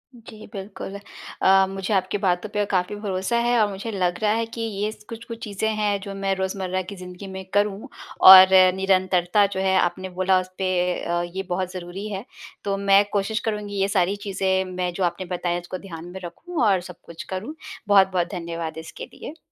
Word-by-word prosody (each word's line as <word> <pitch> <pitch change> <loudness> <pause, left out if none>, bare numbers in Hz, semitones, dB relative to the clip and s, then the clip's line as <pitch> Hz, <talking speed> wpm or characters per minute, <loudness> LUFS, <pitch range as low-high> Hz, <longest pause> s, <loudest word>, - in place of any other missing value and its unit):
जी, 220 -2 -12
बिल्कुल। 195 0 -7 0.4
अ, 195 0 +6
मुझे 195 +1 -3
आपकी 190 +1 +1
बातों 190 0 0
पर 210 0 -1
काफ़ी 185 +1 0
भरोसा 205 +2 -2
है 240 -1 +3
और 210 - +4
मुझे 200 +3 -5
लग 180 -3 -1
रहा 210 - +3
है 230 +1 0
कि 230 0 -8
ये 210 -1 -2
स 210 - -15
कुछ-कुछ 230 0 -8
चीज़ें 210 0 -2
हैं 205 -2 0
जो 200 0 -7
मैं 195 0 -1
रोज़मर्रा 190 -1 -2
की 185 +2 -8
ज़िंदगी 180 +1 -9
में 190 0 -7
करूँ। 205 0 0 0.4
और 190 0 +12 0.3
निरंतरता 190 0 +2
जो - - -1
है 190 0 +2
आपने 185 +1 -1
बोला 185 +1 +2
उस 185 - -5
पे 190 -1 -1 0.3
अ, 175 0 -1
ये 190 - -2
बहुत 185 0 -2
ज़रूरी 185 +3 -6
है, 200 0 -5 0.4
तो 200 -1 -1
मैं 200 0 +5
कोशिश 210 +2 0
करुँगी 210 -2 -3
ये 195 - +3
सारी 195 -1 +1
चीज़ें 190 -2 -1
मैं 180 -1 -2
जो 190 - -2
आपने 175 +1 -1
बताई 175 0 -1
उसको 175 +1 -7
ध्यान 170 -3 -9
में 190 - -7
रखूँ 305 - -4
और 195 -4 +3
सब 180 -1 -10
कुछ 170 - -9
करूँ। 215 +12 -5 0.3
बहुत-बहुत 190 -3 +4
धन्यवाद 170 -2 -5
इसके 160 0 -8
लिए। 320 - -9
195 Hz, 195 wpm, -23 LUFS, 185-205 Hz, 0.4 s, और